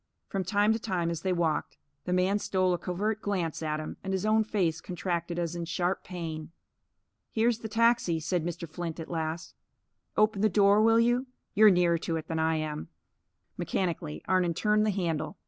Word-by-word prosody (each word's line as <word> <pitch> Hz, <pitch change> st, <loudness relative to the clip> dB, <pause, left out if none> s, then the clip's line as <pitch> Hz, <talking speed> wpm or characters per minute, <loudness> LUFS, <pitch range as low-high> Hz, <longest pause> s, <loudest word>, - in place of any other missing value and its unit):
From 195 Hz, -1 st, -1 dB
time 205 Hz, +3 st, +3 dB
to 225 Hz, -, -2 dB
time, 180 Hz, -6 st, -1 dB
as 165 Hz, -1 st, -4 dB
they 190 Hz, -, 0 dB
walked, 170 Hz, -3 st, 0 dB, 0.3 s
the 180 Hz, -, -2 dB
man 185 Hz, +3 st, +2 dB
stole 185 Hz, -2 st, +1 dB
a 175 Hz, -, -1 dB
covert 210 Hz, +4 st, -2 dB
glance 180 Hz, -7 st, -2 dB
at 155 Hz, -1 st, -1 dB
him, 155 Hz, -, -6 dB
and 195 Hz, 0 st, -2 dB
his 190 Hz, +1 st, -1 dB
own 220 Hz, +1 st, +4 dB
face 180 Hz, -7 st, 0 dB
contracted 175 Hz, -1 st, -3 dB
as 170 Hz, -1 st, -2 dB
in 170 Hz, -1 st, -3 dB
sharp 175 Hz, +2 st, -1 dB
pain. 165 Hz, -4 st, -6 dB, 0.8 s
"Here's 230 Hz, +1 st, +1 dB
the 225 Hz, -, -5 dB
taxi," 230 Hz, -7 st, +3 dB
said 170 Hz, +1 st, -1 dB
Mr. 170 Hz, 0 st, -4 dB
Flint 165 Hz, +1 st, -5 dB
at 165 Hz, -, -7 dB
last. 160 Hz, 0 st, -3 dB, 0.6 s
"Open 215 Hz, -2 st, +3 dB
the 215 Hz, -, +4 dB
door, 200 Hz, +2 st, +5 dB
will 225 Hz, +1 st, +5 dB
you? 240 Hz, +3 st, +2 dB, 0.3 s
You're 215 Hz, +1 st, +7 dB
nearer 175 Hz, -3 st, +3 dB
to 165 Hz, -, -2 dB
it 160 Hz, -, -4 dB
than 165 Hz, -1 st, -2 dB
I 160 Hz, 0 st, +2 dB
am." 155 Hz, -1 st, -3 dB, 0.7 s
Mechanically, 170 Hz, -3 st, -2 dB
Arnon 180 Hz, -3 st, +2 dB
turned 210 Hz, +2 st, +2 dB
the -, -, +3 dB
handle. 175 Hz, -2 st, -2 dB
180 Hz, 190 wpm, -29 LUFS, 165-210 Hz, 0.8 s, You're